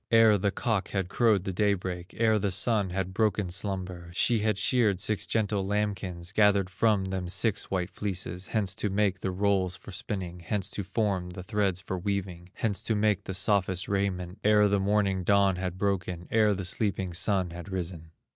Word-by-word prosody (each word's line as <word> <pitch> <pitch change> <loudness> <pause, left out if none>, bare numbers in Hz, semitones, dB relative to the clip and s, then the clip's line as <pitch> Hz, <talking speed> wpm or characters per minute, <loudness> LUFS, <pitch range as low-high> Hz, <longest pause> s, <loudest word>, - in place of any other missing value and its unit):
Ere 115 -2 +6
the 100 0 +1
cock 105 0 -1
had 95 -3 -2
crowed 110 -4 +3
the 95 - -3
day 100 +1 +2
break, 90 -1 -6
Ere 110 -2 +3
the 100 0 0
Sun 100 +1 +1
had 95 0 -3
broken 105 -3 0
slumber; 90 -2 -3
She 115 +4 +3
had 105 -1 0
sheared 105 -3 +2
six 110 +2 0
gentle 105 -3 0
lambkins, 95 -3 -2
Gathered 100 -3 +3
from 100 0 +2
them 95 -1 -3
six 95 +4 +1
white 90 -1 -2
fleeces, 95 -2 -4
Hence 100 -4 0
to 105 - -1
make 100 -1 +1
the 95 - -2
rolls 95 -1 +1
for 100 - -12
spinning, 95 -2 -5
Hence 95 +3 -3
to 100 - -3
form 95 -2 -1
the 90 0 -8
threads 100 -3 0
for 95 -1 -4
weaving, 90 -2 -3
Hence 110 -5 -1
to 110 - -1
make 105 -1 +1
the 95 - -3
softest 95 -1 +1
raiment, 95 -2 -2
Ere 105 0 +5
the 100 0 +2
morning 100 -1 +1
dawn 100 -1 +3
had 90 -1 -4
broken, 95 -3 -2
Ere 105 -2 +3
the 95 -1 -4
sleeping 95 -1 -1
Sun 95 -1 +1
had 85 +3 -8
risen. 85 -3 -5
95 Hz, 190 wpm, -28 LUFS, 90-105 Hz, -, Ere